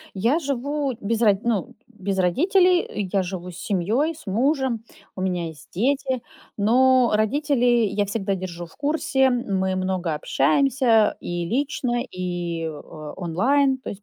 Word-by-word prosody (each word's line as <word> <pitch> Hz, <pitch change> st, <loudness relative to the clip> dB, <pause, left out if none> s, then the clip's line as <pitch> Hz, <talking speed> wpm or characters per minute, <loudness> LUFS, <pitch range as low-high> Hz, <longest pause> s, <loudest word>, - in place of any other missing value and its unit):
Я 230 Hz, -, +2 dB
живу 280 Hz, -1 st, -2 dB
без 225 Hz, +3 st, -1 dB
ро 210 Hz, -3 st, +6 dB
ну, 235 Hz, +2 st, -1 dB
без 200 Hz, -4 st, -4 dB
родителей, 350 Hz, -, +2 dB
я 195 Hz, -2 st, +2 dB
живу 180 Hz, -1 st, -6 dB
с 175 Hz, -, -11 dB
семьей, 215 Hz, -, 0 dB
с 305 Hz, -, -15 dB
мужем, 250 Hz, +1 st, 0 dB, 0.3 s
у 185 Hz, -, -4 dB
меня 180 Hz, -3 st, -1 dB
есть 160 Hz, -2 st, -10 dB
дети. 260 Hz, +4 st, 0 dB, 0.4 s
Но 250 Hz, +3 st, +4 dB
родителей 240 Hz, 0 st, +2 dB
я 205 Hz, +1 st, 0 dB
всегда 200 Hz, -1 st, -2 dB
держу 175 Hz, -2 st, -6 dB
в 165 Hz, -, -20 dB
курсе, 280 Hz, -3 st, +1 dB
мы 195 Hz, -7 st, 0 dB
много 185 Hz, -3 st, -1 dB
общаемся 225 Hz, -, +2 dB
и 175 Hz, -1 st, -3 dB
лично, 250 Hz, -, -1 dB
и 175 Hz, -2 st, -3 dB
о 150 Hz, 0 st, -9 dB
онлайн, 260 Hz, -, +2 dB
то 260 Hz, -, -9 dB
есть 200 Hz, 0 st, -9 dB
220 Hz, 145 wpm, -23 LUFS, 185-265 Hz, 0.4 s, ро